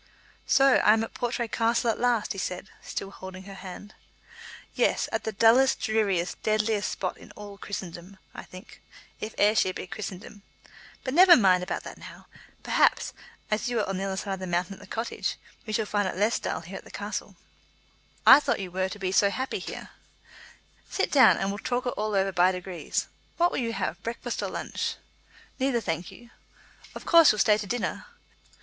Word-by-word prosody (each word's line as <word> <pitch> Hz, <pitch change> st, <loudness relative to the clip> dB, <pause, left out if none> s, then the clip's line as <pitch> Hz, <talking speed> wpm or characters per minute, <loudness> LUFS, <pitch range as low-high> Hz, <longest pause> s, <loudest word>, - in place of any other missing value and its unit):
"So 270 Hz, -1 st, +5 dB
I 210 Hz, -, +5 dB
am 220 Hz, 0 st, +1 dB
at 225 Hz, -, -7 dB
Portray 240 Hz, 0 st, -2 dB
Castle 230 Hz, +1 st, +1 dB
at -, -, -6 dB
last," 240 Hz, -3 st, +1 dB
he 195 Hz, -, -4 dB
said, 180 Hz, +1 st, -4 dB
still 195 Hz, -, -5 dB
holding 190 Hz, -1 st, -9 dB
her 195 Hz, +1 st, -10 dB
hand. 195 Hz, +2 st, -10 dB, 0.8 s
"Yes, -, -, +1 dB
at -, -, -2 dB
the 220 Hz, -, -1 dB
dullest, 230 Hz, +5 st, +4 dB
dreariest, 200 Hz, -5 st, 0 dB
deadliest 215 Hz, -1 st, 0 dB
spot 185 Hz, -, -3 dB
in -, -, -14 dB
all 205 Hz, -1 st, -10 dB
Christendom, 185 Hz, -1 st, -7 dB, 0.2 s
I -, -, -7 dB
think, 185 Hz, +5 st, -13 dB, 0.4 s
if 215 Hz, -, -6 dB
Ayrshire 205 Hz, -3 st, +3 dB
be -, -, -5 dB
Christendom. 200 Hz, +1 st, -8 dB, 0.6 s
But 260 Hz, -, -3 dB
never 355 Hz, +2 st, +8 dB
mind 185 Hz, -5 st, +4 dB
about 180 Hz, -, -4 dB
that -, -, -9 dB
now. -, -, -12 dB, 0.4 s
Perhaps, -, -, +2 dB, 0.4 s
as 215 Hz, +3 st, 0 dB
you 240 Hz, -, -1 dB
are 210 Hz, -, 0 dB
at 195 Hz, -, -2 dB
the 190 Hz, -, -3 dB
other 195 Hz, -1 st, -3 dB
side 195 Hz, 0 st, -3 dB
of 190 Hz, -, -5 dB
the 185 Hz, -, -5 dB
mountain 175 Hz, +2 st, -1 dB
at 195 Hz, -, -13 dB
the 205 Hz, -, -13 dB
Cottage, 225 Hz, +4 st, -3 dB, 0.3 s
we 215 Hz, -, -4 dB
shall 220 Hz, 0 st, +1 dB
find 205 Hz, -1 st, 0 dB
it 185 Hz, -, -4 dB
less 210 Hz, +4 st, +2 dB
dull -, -, -3 dB
here -, -, -8 dB
at -, -, -10 dB
the -, -, -15 dB
castle." -, -, -5 dB, 0.9 s
"I 270 Hz, -, +10 dB
thought 295 Hz, -, -1 dB
you 190 Hz, -2 st, -5 dB
were 185 Hz, +1 st, -1 dB
to 200 Hz, -, -7 dB
be 190 Hz, -2 st, -2 dB
so 200 Hz, +1 st, +4 dB
happy 260 Hz, +6 st, -3 dB
here." -, -, -8 dB, 1.0 s
"Sit 390 Hz, -, -1 dB
down 260 Hz, -6 st, +7 dB
and 195 Hz, -, -1 dB
we'll 200 Hz, +1 st, -4 dB
talk 245 Hz, +2 st, -2 dB
it -, -, +1 dB
all 215 Hz, -3 st, -2 dB
over 195 Hz, 0 st, +2 dB
by 180 Hz, 0 st, +4 dB
degrees. 180 Hz, -1 st, -4 dB, 0.3 s
What 345 Hz, +1 st, +3 dB
will -, -, -2 dB
you 230 Hz, -2 st, -2 dB
have, -, -, -3 dB
breakfast 230 Hz, +1 st, -4 dB
or -, -, -2 dB
lunch?" -, -, -3 dB, 0.6 s
"Neither, 260 Hz, -2 st, +1 dB
thank 170 Hz, -4 st, -3 dB
you." 240 Hz, -1 st, -15 dB, 0.6 s
"Of -, -, -8 dB
course 335 Hz, -3 st, +7 dB
you'll 210 Hz, -, -3 dB
stay 210 Hz, +1 st, +4 dB
to 205 Hz, -, -5 dB
dinner?" 245 Hz, +4 st, -3 dB
210 Hz, 200 wpm, -27 LUFS, 190-230 Hz, 1.0 s, I